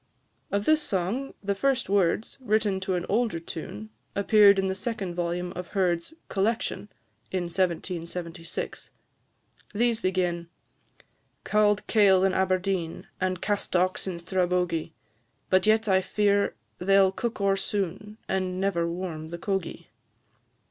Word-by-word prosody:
Of 200 +1 0
this 310 0 +4
song, 210 +3 -2
the 200 0 +1
first 265 +4 +1
words, 200 +5 +1
written 215 -4 +1
to 190 -1 -1
an 175 0 -2
older 220 -4 +1
tune, 110 - -7 0.2
appeared 200 0 +6
in 195 - +1
the 190 - 0
second 195 -2 -3
volume 175 +1 -2
of 180 0 -5
Herd's 180 - 0
"Collection," 210 +1 -1 0.4
in 185 -1 0
1776. 170 -1 -3 0.9
These 230 +1 +2
begin 175 -3 0 0.9
"Cauld 210 -1 +2
kail 195 -4 +5
in 190 -1 +3
Aberdeen, 185 -2 -1
And 185 -1 -1
castocks 185 -3 0
in 180 -2 -3
Strabogie; 180 -2 0 0.6
But 185 +2 +4
yet 220 +1 +4
I 190 -1 +4
fear 200 +1 +1 0.2
they 195 +2 +4
'll 190 -1 +5
cook 230 +4 -3
o'er 200 -1 +3
soon, 200 +1 -3
And 185 -1 -1
never 180 -4 +1
warm 170 -3 -5
the 170 - -5
cogie." 195 -1 -3
190 Hz, 130 wpm, -27 LUFS, 175-205 Hz, 0.9 s, appeared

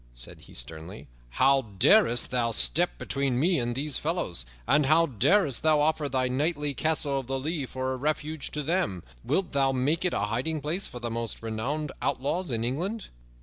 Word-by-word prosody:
said - - -7
he - - -15
sternly. 80 +3 -6 0.2
"How 135 - +3
darest 120 - +3
thou 120 -2 +1
step 175 +9 +3
between 135 -3 -1
me 170 +2 +3
and 120 0 -2
these 145 +2 -2
fellows? 150 - -2 0.2
And 150 -2 +3
how 160 +3 +5
darest 140 - +2
thou 155 -1 +4
offer 150 -1 +1
thy 130 -1 +1
knightly 145 +2 -1
Castle 145 -1 0
of 130 - -8
the 135 0 -1
Lea 145 0 -3
for 130 +1 -3
a - - -4
refuge 150 +2 -2
to 150 - -2
them? 155 - 0 0.2
Wilt 185 -4 0
thou 135 -1 +2
make 145 +7 +1
it 180 - 0
a - - 0
hiding 125 +10 -1
place 165 +7 -2
for 125 - -8
the 120 -1 -4
most 115 -1 -4
renowned 130 +7 -3
outlaws 145 +7 -1
in 115 -2 -1
England?" 180 - -3
140 Hz, 190 wpm, -27 LUFS, 120-155 Hz, 0.2 s, how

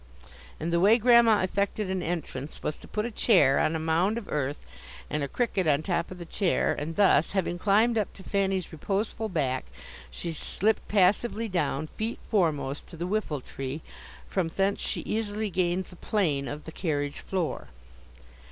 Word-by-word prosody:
And 165 +2 -2
the 170 - +4
way 205 +6 +6
Grandma 235 -3 +6
effected 200 +2 -1
an 190 -1 -1
entrance 155 -5 -4
was 150 - -1
to - - -13
put 210 +1 -2
a 240 - -3
chair 175 - +4
on 160 - +2
a - - -1
mound 165 +7 +1
of 235 - -6
earth, 145 -1 -2 0.5
and 150 - 0
a 140 - -1
cricket 195 - 0
on 150 0 +3
top 170 -1 -1
of 185 - -8
the 175 - -7
chair, 185 +1 +1
and 160 +3 -4
thus, 195 -5 +4
having 180 -3 -1
climbed 220 +4 +3
up 210 - -1
to 190 - -13
Fanny's 195 -2 0
reposeful 205 +6 -2
back, 135 -8 -1 0.4
she 170 - -5
slipped 215 +7 0
passively 210 +3 +2
down, 175 -6 -1
feet 220 +8 -4
foremost, 155 - 0
to 170 - -11
the 170 - -3
whiffle 180 -8 -1
tree; 135 +4 -6 0.5
from 185 -4 0
thence 195 +4 0
she - - -2
easily 215 -1 -2
gained 180 0 0
the 180 - -14
plane 160 -9 0
of 150 +1 -6
the 160 - -8
carriage 145 -5 -2
floor. 175 - -3
180 Hz, 180 wpm, -28 LUFS, 155-210 Hz, 0.5 s, way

